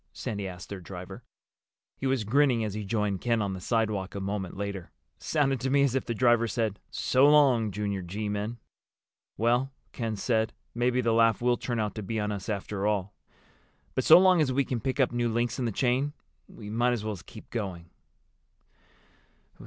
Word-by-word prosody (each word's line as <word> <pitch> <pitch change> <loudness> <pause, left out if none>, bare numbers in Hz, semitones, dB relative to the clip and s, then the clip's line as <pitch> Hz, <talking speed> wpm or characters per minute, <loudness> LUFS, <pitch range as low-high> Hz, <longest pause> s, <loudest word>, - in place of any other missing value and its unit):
Sandy 100 -2 -4
asked 90 -1 -9
their 100 - -6
driver. 90 0 -9 0.7
He 135 - -3
was 130 -4 +1
grinning 125 +1 +3
as 105 -2 -3
he 105 0 -4
joined 105 -2 -1
Ken 115 -2 +1
on 100 -2 -1
the 95 - -6
sidewalk 105 -4 -1
a - - -3
moment 95 -1 -4
later. 100 -3 -4 0.3
"Sounded 135 -4 +1
to 130 - -2
me 140 +1 +4
as 135 -3 +2
if 135 - -1
the 115 - -2
driver 120 0 +3
said, 110 -3 -2
'So 135 +3 +3
long, 135 -7 +5
Junior 100 -1 -3
G 100 +5 -4
men.'" 105 +3 -3 0.8
"Well," 120 +5 +2 0.2
Ken 115 -3 -3
said, 110 +1 0 0.2
"maybe 125 +1 +1
the 115 -2 +1
laugh 115 -1 +4
will 120 0 +2
turn 120 -1 -3
out 105 -1 -1
to 110 - -5
be 110 +2 -3
on 105 0 -1
us 100 +1 -5
after 100 0 -2
all. 100 -1 -1 0.8
But - - 0
so - - +9
long 185 -2 +5
as 140 -4 +2
we 135 +1 +1
can 125 - -2
pick 130 +4 -2
up 130 - +3
new 120 -1 0
links 120 +1 -1
in 125 - 0
the 115 - 0
chain 130 +6 +1 0.3
we 105 - -11
might 120 +2 +2
as 115 -3 -3
well 110 -1 -2
keep - - -13
going." 90 -7 -5
115 Hz, 195 wpm, -28 LUFS, 100-125 Hz, 0.8 s, so